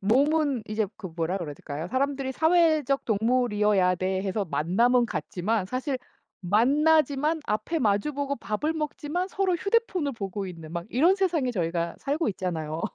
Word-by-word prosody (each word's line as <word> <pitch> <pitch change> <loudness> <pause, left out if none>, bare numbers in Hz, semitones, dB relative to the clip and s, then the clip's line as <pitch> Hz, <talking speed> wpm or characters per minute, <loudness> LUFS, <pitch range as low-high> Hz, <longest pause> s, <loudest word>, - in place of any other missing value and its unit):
몸은 275 +4 +2
이제 215 0 0
그 190 - -7
뭐라 165 +2 -2
그래야 150 -5 -5
될까요? 150 +5 -6
사람들이 270 +1 -1
사회적 315 -4 +3
동물이어야 210 -5 +2
돼 190 +1 -1
해서 200 +1 -1
만남은 195 - +2
갖지만 185 +5 -2
사실 255 +4 -2 0.4
만나지만 295 - +3
앞에 215 +11 -1
마주 210 +5 +1
보고 280 0 -2
밥을 235 +9 -2
먹지만 310 +3 -3
서로 385 -2 0
휴대폰을 375 - 0
보고 200 -2 -4
있는 165 -3 -9
막 170 0 -4
이런 335 +10 +4
세상에 340 -9 +1
저희가 170 -5 -2
살고 290 +1 -1
있잖아요. 165 -5 -3
235 Hz, 350 characters per minute, -26 LUFS, 185-300 Hz, 0.4 s, 이런